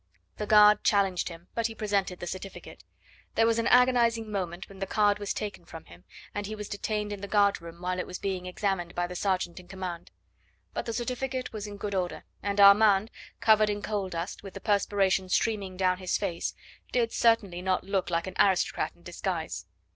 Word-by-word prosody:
The 210 Hz, -, -3 dB
guard 210 Hz, 0 st, +7 dB
challenged 195 Hz, -4 st, +2 dB
him, 170 Hz, +1 st, -12 dB
but 230 Hz, -1 st, 0 dB
he 225 Hz, -, -9 dB
presented 200 Hz, -4 st, -1 dB
the -, -, -5 dB
certificate. 185 Hz, +2 st, -8 dB, 0.5 s
There 225 Hz, -, +4 dB
was 230 Hz, 0 st, +2 dB
an 230 Hz, -, +1 dB
agonising 235 Hz, -3 st, +4 dB
moment 180 Hz, -3 st, -3 dB
when 195 Hz, -1 st, -13 dB
the 195 Hz, -, -3 dB
card 205 Hz, 0 st, +2 dB
was 205 Hz, -1 st, -3 dB
taken 205 Hz, -4 st, -4 dB
from 165 Hz, -1 st, -11 dB
him, 85 Hz, 0 st, -16 dB, 0.3 s
and 205 Hz, -1 st, -3 dB
he 215 Hz, -, -5 dB
was 210 Hz, -1 st, -6 dB
detained 210 Hz, 0 st, -2 dB
in 200 Hz, -, -7 dB
the 200 Hz, -, -5 dB
guard 200 Hz, -2 st, +3 dB
room 170 Hz, 0 st, -10 dB
while 180 Hz, 0 st, -1 dB
it -, -, -3 dB
was 180 Hz, -, -5 dB
being 185 Hz, -2 st, -3 dB
examined 180 Hz, -2 st, -2 dB
by 175 Hz, -, 0 dB
the 180 Hz, +1 st, -7 dB
sergeant 185 Hz, -1 st, -1 dB
in 180 Hz, -, -14 dB
command. 185 Hz, -2 st, -6 dB, 0.6 s
But -, -, -4 dB
the 230 Hz, -, -2 dB
certificate 255 Hz, +2 st, -3 dB
was 210 Hz, -1 st, -5 dB
in 205 Hz, 0 st, -8 dB
good 200 Hz, 0 st, -4 dB
order, 180 Hz, -2 st, -2 dB, 0.2 s
and 200 Hz, 0 st, -2 dB
Armand, 200 Hz, +1 st, +6 dB, 0.3 s
covered 215 Hz, -1 st, +5 dB
in 205 Hz, 0 st, -3 dB
coal 205 Hz, -3 st, -2 dB
dust, 170 Hz, +1 st, -5 dB
with 195 Hz, -2 st, -10 dB
the -, -, -5 dB
perspiration 195 Hz, -2 st, +1 dB
streaming 195 Hz, -2 st, 0 dB
down 185 Hz, -1 st, +2 dB
his 185 Hz, -1 st, 0 dB
face, 180 Hz, -5 st, -3 dB, 0.4 s
did 235 Hz, -2 st, +1 dB
certainly 205 Hz, -6 st, +2 dB
not 185 Hz, 0 st, 0 dB
look 195 Hz, -1 st, -1 dB
like 170 Hz, -1 st, 0 dB
an 185 Hz, -, -6 dB
aristocrat 190 Hz, -3 st, +2 dB
in 175 Hz, -, -24 dB
disguise. 165 Hz, -, -4 dB
195 Hz, 205 wpm, -28 LUFS, 180-210 Hz, 0.6 s, guard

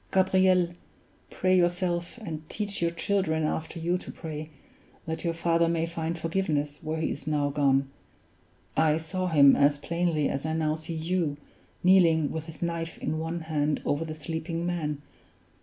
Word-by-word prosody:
"Gabriel, 185 Hz, -2 st, +4 dB, 0.6 s
pray 185 Hz, 0 st, +2 dB
yourself, 175 Hz, +1 st, +1 dB
and 155 Hz, -5 st, -6 dB
teach 205 Hz, -3 st, -3 dB
your 170 Hz, -, +3 dB
children 170 Hz, -2 st, 0 dB
after 160 Hz, +2 st, -2 dB
you 175 Hz, +2 st, 0 dB
to -, -, -9 dB
pray, 155 Hz, -1 st, -6 dB, 0.6 s
that 160 Hz, 0 st, -4 dB
your 170 Hz, -1 st, -1 dB
father 165 Hz, 0 st, +2 dB
may 165 Hz, -1 st, +1 dB
find 165 Hz, 0 st, -3 dB
forgiveness 160 Hz, -4 st, -1 dB
where 160 Hz, +1 st, -3 dB
he 160 Hz, -, 0 dB
is 145 Hz, -, -7 dB
now 145 Hz, -2 st, +1 dB
gone. 140 Hz, -1 st, +2 dB, 0.9 s
I 155 Hz, -1 st, +3 dB
saw 185 Hz, +3 st, -3 dB
him 145 Hz, -5 st, +7 dB
as 145 Hz, 0 st, +4 dB
plainly 165 Hz, -1 st, 0 dB
as 140 Hz, -, -2 dB
I 160 Hz, 0 st, -1 dB
now 155 Hz, -1 st, +1 dB
see 160 Hz, +1 st, -5 dB
you, 160 Hz, -2 st, -1 dB, 0.5 s
kneeling 170 Hz, -5 st, +5 dB
with 160 Hz, -1 st, -4 dB
his 160 Hz, +1 st, -8 dB
knife 165 Hz, -1 st, -3 dB
in 155 Hz, -, -2 dB
one 165 Hz, +1 st, -3 dB
hand 150 Hz, -2 st, 0 dB
over 145 Hz, +3 st, +1 dB
the 155 Hz, -1 st, -5 dB
sleeping 165 Hz, +2 st, -4 dB
man. 150 Hz, -5 st, -2 dB
160 Hz, 165 wpm, -28 LUFS, 155-175 Hz, 0.9 s, him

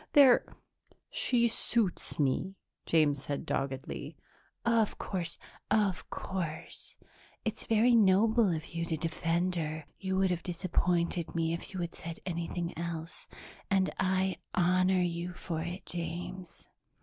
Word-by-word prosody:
"They're 270 Hz, -4 st, +8 dB, 0.7 s
she 235 Hz, -2 st, +2 dB
suits 230 Hz, -3 st, +1 dB
me," 150 Hz, +7 st, +1 dB, 0.3 s
James 150 Hz, -4 st, +3 dB
said 145 Hz, -1 st, -3 dB
doggedly. 140 Hz, +2 st, -3 dB, 0.5 s
"Of 230 Hz, -2 st, +3 dB
course, 175 Hz, -3 st, -3 dB, 0.3 s
of 200 Hz, -4 st, +1 dB
course. 170 Hz, -5 st, -5 dB, 0.5 s
It's 220 Hz, -, -3 dB
very 230 Hz, +2 st, +4 dB
noble 220 Hz, +1 st, +5 dB
of 160 Hz, +1 st, -4 dB
you 170 Hz, 0 st, -1 dB
to 165 Hz, -1 st, -1 dB
defend 170 Hz, +3 st, 0 dB
her; 155 Hz, -1 st, -3 dB
you 190 Hz, -1 st, -1 dB
would 190 Hz, -1 st, +3 dB
have 175 Hz, -1 st, -1 dB
disappointed 175 Hz, -1 st, 0 dB
me 165 Hz, 0 st, +1 dB
if 170 Hz, -, -5 dB
you 185 Hz, -, -2 dB
had 170 Hz, -1 st, -3 dB
said 165 Hz, 0 st, -7 dB
anything 170 Hz, -1 st, -3 dB
else, 165 Hz, 0 st, -5 dB, 0.4 s
and 190 Hz, -1 st, +3 dB
I 190 Hz, 0 st, +1 dB, 0.2 s
honor 185 Hz, +1 st, +3 dB
you 175 Hz, +1 st, -2 dB
for 170 Hz, -2 st, -4 dB
it, 175 Hz, +3 st, -5 dB
James." 175 Hz, +1 st, -5 dB
175 Hz, 130 wpm, -31 LUFS, 165-190 Hz, 0.7 s, They're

